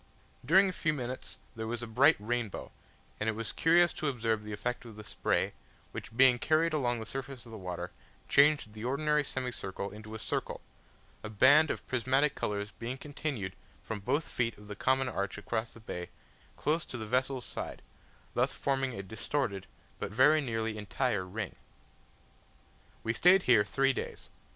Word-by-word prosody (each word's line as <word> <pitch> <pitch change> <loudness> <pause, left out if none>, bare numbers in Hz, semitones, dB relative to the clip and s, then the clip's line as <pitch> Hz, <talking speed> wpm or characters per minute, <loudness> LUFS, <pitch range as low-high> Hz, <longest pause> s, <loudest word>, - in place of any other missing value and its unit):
During 190 +9 +6
a - - 0
few 155 -2 0
minutes 130 -2 -4 0.2
there 110 0 -4
was 120 +1 -3
a - - -2
bright 130 +8 +5
rainbow, 115 -1 -3 0.5
and 105 - +1
it - - +1
was 115 0 -4
curious 170 +1 +4
to 155 - -2
observe 115 -5 0
the 105 0 -8
effect 120 +4 -3
of 115 -3 -11
the 105 - -9
spray, - - 0 0.4
which 115 - -8
being 130 -2 +7
carried 155 +3 +2
along 120 -5 +1
the 110 - -5
surface 135 +1 -6
of 115 - -12
the 110 - -7
water, 90 -1 -5 0.4
changed 140 -6 +4
the 110 0 -8
ordinary 150 +4 +2
semicircle 125 -8 -4
into 110 +1 -9
a - - -3
circle - - -3 0.6
a 110 - -5
band 140 +9 +6
of - - -3
prismatic 135 +3 +2
colours 105 -4 -2
being 120 +3 -4
continued, 140 -9 -4 0.3
from 110 -2 -4
both 135 +10 0
feet 115 -2 -1
of 105 - -14
the 105 - -5
common 130 +5 +2
arch 100 -4 -2
across 110 +2 -2
the - - -14
bay, 90 -5 -6 0.5
close 155 +3 +1
to 120 - -7
the 110 - -5
vessel's 130 +3 0
side: - - -6 0.5
thus - - +1
forming 135 -2 0
a 100 - -5
distorted, 100 - -2 0.3
but - - -3
very 150 +7 +5
nearly 115 -4 -2
entire 105 -2 -1
ring. 105 +1 -4 1.5
We 115 - 0
stayed 180 +7 +6
here 115 -5 +6
three 135 +5 +2
days. - - -6
120 Hz, 175 wpm, -31 LUFS, 110-140 Hz, 1.5 s, being